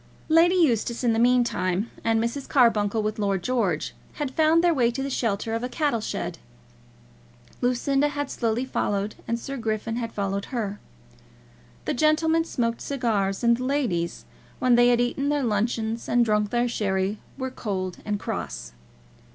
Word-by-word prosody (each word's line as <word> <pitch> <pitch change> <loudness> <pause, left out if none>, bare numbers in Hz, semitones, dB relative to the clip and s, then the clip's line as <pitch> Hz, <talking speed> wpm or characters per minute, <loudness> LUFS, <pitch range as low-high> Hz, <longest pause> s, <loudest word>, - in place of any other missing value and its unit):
Lady 335 +3 +5
Eustace, 240 - +2
in 235 -2 +3
the 225 - +1
meantime, 235 -5 +2
and 225 0 +2
Mrs. 235 +5 -3
Carbuncle, 220 -4 +3
with 215 0 -2
Lord 195 -3 0
George, 205 -11 0 0.2
had 290 -3 -3
found 320 +2 +4
their 345 -1 +4
way 245 -5 +3
to 265 +3 -3
the 275 - -3
shelter 225 -2 -1
of 230 +1 -2
a 250 - -2
cattle 285 -6 0
shed. - - -4 1.2
Lucinda 270 +3 +2
had 290 -1 -3
slowly 230 +1 -1
followed, 205 -5 -1
and 235 0 -1
Sir 275 +3 -5
Griffin 225 0 -2
had 230 -2 -3
followed 200 -1 -2
her. 210 -5 -3 1.1
The - - 0
gentlemen 320 +3 +3
smoked 230 -7 -1
cigars, 220 -8 -1
and 235 0 +4
the 250 - -4
ladies, 235 -12 -1 0.3
when 250 -1 +3
they 240 0 +6
had 240 -1 +4
eaten 255 +4 0
their 290 -1 +1
luncheons 225 +1 -1
and 240 -1 +4
drank 210 -1 +1
their 240 +2 +1
sherry, 200 -2 -1 0.2
were 260 -1 -3
cold 185 -7 -4
and 210 -1 -2
cross. - - -5
235 Hz, 165 wpm, -25 LUFS, 210-265 Hz, 1.2 s, they